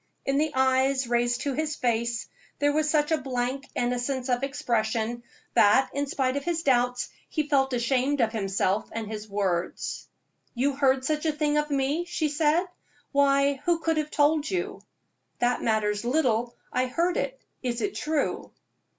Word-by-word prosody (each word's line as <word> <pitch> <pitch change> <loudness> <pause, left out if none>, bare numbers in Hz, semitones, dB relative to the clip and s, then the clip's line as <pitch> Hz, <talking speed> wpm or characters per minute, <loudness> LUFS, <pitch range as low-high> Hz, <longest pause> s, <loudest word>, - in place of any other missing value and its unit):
In 275 +1 +1
the 310 0 +1
eyes 265 0 +3
raised 240 0 +1
to 280 - -1
his 310 +2 -1
face 235 -1 -1 0.3
there 290 0 +2
was 310 0 +1
such 300 0 +2
blank 260 +1 -2
innocence 250 +2 -1
of 245 0 +1
expression 235 -4 -1 0.3
that, 215 +6 +5
in 285 +1 -1
spite 265 -1 0
of 280 - -2
his 335 +1 -1
doubts, 245 -2 +2 0.2
he 305 -2 -1
felt 270 -2 +2
ashamed 255 +3 +1
of 225 -3 +2
himself 195 -1 0
and 225 -1 -3
his 210 0 -7
words. 190 -3 -2 0.5
"You 275 +4 +1
heard 265 -1 +2
such 305 +2 0
a - - +3
thing 300 0 0
of 300 0 -2
me!" 285 +4 0
she 340 -3 -1
said. 310 +4 +2 0.5
"Why, 280 0 +3
who 345 -1 +3
could 325 -1 0
have 305 -1 -1
told 300 +1 +2
you?" 375 +2 -3 0.6
"That 245 0 +1
matters 210 -2 0
little; 240 -3 +1 0.2
I 255 0 +1
heard 340 +7 0
it. - - -2 0.2
Is 245 -2 -2
it 400 - -1
true?" 305 -1 -2
270 Hz, 165 wpm, -27 LUFS, 240-300 Hz, 0.6 s, that